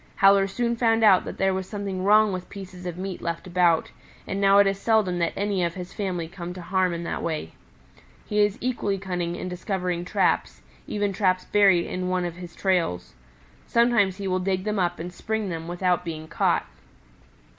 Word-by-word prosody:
Howler 195 Hz, 0 st, +5 dB
soon 235 Hz, +4 st, -1 dB
found 225 Hz, -1 st, +2 dB
out 195 Hz, -4 st, +6 dB
that -, -, -6 dB
there 195 Hz, 0 st, +2 dB
was 190 Hz, 0 st, -4 dB
something 200 Hz, -3 st, -4 dB
wrong 210 Hz, 0 st, +5 dB
with 185 Hz, -1 st, -6 dB
pieces 185 Hz, -2 st, -9 dB
of 175 Hz, -1 st, -5 dB
meat 185 Hz, 0 st, -5 dB
left 170 Hz, -1 st, -4 dB
about, 175 Hz, -2 st, +2 dB, 0.3 s
and 195 Hz, -, -3 dB
now 195 Hz, 0 st, +5 dB
it 200 Hz, -, +7 dB
is 195 Hz, 0 st, 0 dB
seldom 205 Hz, -5 st, +2 dB
that 170 Hz, -, +1 dB
any 200 Hz, -2 st, 0 dB
of 170 Hz, -1 st, -1 dB
his 180 Hz, -1 st, -7 dB
family 180 Hz, -5 st, -3 dB
come 175 Hz, 0 st, -7 dB
to 180 Hz, -, -7 dB
harm 185 Hz, +1 st, +1 dB
in 170 Hz, 0 st, -4 dB
that -, -, -3 dB
way. 155 Hz, -, -3 dB, 0.7 s
He 210 Hz, -, -1 dB
is 205 Hz, -1 st, +3 dB
equally 230 Hz, -5 st, -1 dB
cunning 180 Hz, -3 st, -3 dB
in 185 Hz, -, -5 dB
discovering 180 Hz, -1 st, -2 dB
traps, 180 Hz, -, 0 dB, 0.2 s
even 205 Hz, -1 st, -1 dB
traps 185 Hz, -2 st, +1 dB
buried 195 Hz, -4 st, +4 dB
in 180 Hz, 0 st, -3 dB
one 185 Hz, -1 st, 0 dB
of 175 Hz, 0 st, -5 dB
his 175 Hz, -1 st, -10 dB
trails. 170 Hz, -, 0 dB, 0.5 s
Sometimes 235 Hz, -5 st, +3 dB
he 200 Hz, -1 st, -4 dB
will 185 Hz, 0 st, 0 dB
dig 185 Hz, 0 st, -1 dB
them 210 Hz, -1 st, -1 dB
up 175 Hz, -1 st, 0 dB
and 175 Hz, +2 st, -6 dB
spring 220 Hz, +1 st, -3 dB
them 165 Hz, -1 st, -5 dB
without 180 Hz, 0 st, 0 dB
being 160 Hz, -2 st, -6 dB
caught. -, -, +1 dB
185 Hz, 200 wpm, -25 LUFS, 175-200 Hz, 0.7 s, it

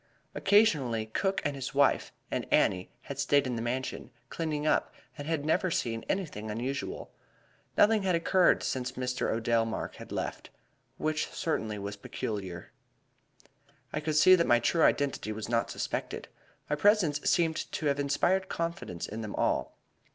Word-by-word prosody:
Occasionally, 150 Hz, -, +3 dB
Cook 195 Hz, -, -1 dB
and 145 Hz, -1 st, 0 dB
his 135 Hz, +1 st, -5 dB
wife 140 Hz, 0 st, +3 dB, 0.2 s
and -, -, -3 dB
Annie 90 Hz, -1 st, +3 dB
had 140 Hz, -1 st, -7 dB
stayed 140 Hz, 0 st, +3 dB
in 125 Hz, -2 st, -2 dB
the 115 Hz, -, -3 dB
Mansion, 125 Hz, +3 st, -3 dB, 0.2 s
cleaning 155 Hz, -2 st, -2 dB
up, 155 Hz, -, +2 dB, 0.2 s
and 145 Hz, -, -7 dB
had 160 Hz, -3 st, -1 dB
never 180 Hz, +4 st, +2 dB
seen 115 Hz, -8 st, -1 dB
anything 150 Hz, -, -2 dB
unusual. 135 Hz, -, -4 dB, 0.7 s
Nothing 215 Hz, 0 st, +5 dB
had 185 Hz, -2 st, +2 dB
occurred 175 Hz, +2 st, +3 dB
since 125 Hz, -1 st, -2 dB
Mr. 125 Hz, 0 st, -2 dB
Odell 115 Hz, 0 st, +2 dB
Mark 115 Hz, -1 st, -4 dB
had -, -, -11 dB
left -, -, -4 dB, 0.5 s
which 155 Hz, 0 st, -1 dB
certainly 110 Hz, -, -2 dB
was 100 Hz, 0 st, -5 dB
peculiar. 95 Hz, -4 st, -5 dB, 1.2 s
"I -, -, 0 dB
could 155 Hz, 0 st, -2 dB
see 170 Hz, +5 st, +7 dB
that 170 Hz, -2 st, +4 dB
my 120 Hz, -, +6 dB
true 160 Hz, +8 st, +1 dB
identity 140 Hz, -8 st, +2 dB
was 110 Hz, 0 st, -5 dB
not 115 Hz, 0 st, 0 dB
suspected. -, -, -4 dB, 0.4 s
My 150 Hz, -, 0 dB
presence 170 Hz, -4 st, +3 dB
seemed 165 Hz, -2 st, +1 dB
to 155 Hz, -, -3 dB
have 140 Hz, -1 st, +1 dB
inspired 180 Hz, +7 st, +1 dB
confidence 165 Hz, -, -3 dB
in 110 Hz, +2 st, -6 dB
them 105 Hz, -2 st, -5 dB
all. -, -, 0 dB
140 Hz, 160 wpm, -30 LUFS, 115-165 Hz, 1.2 s, see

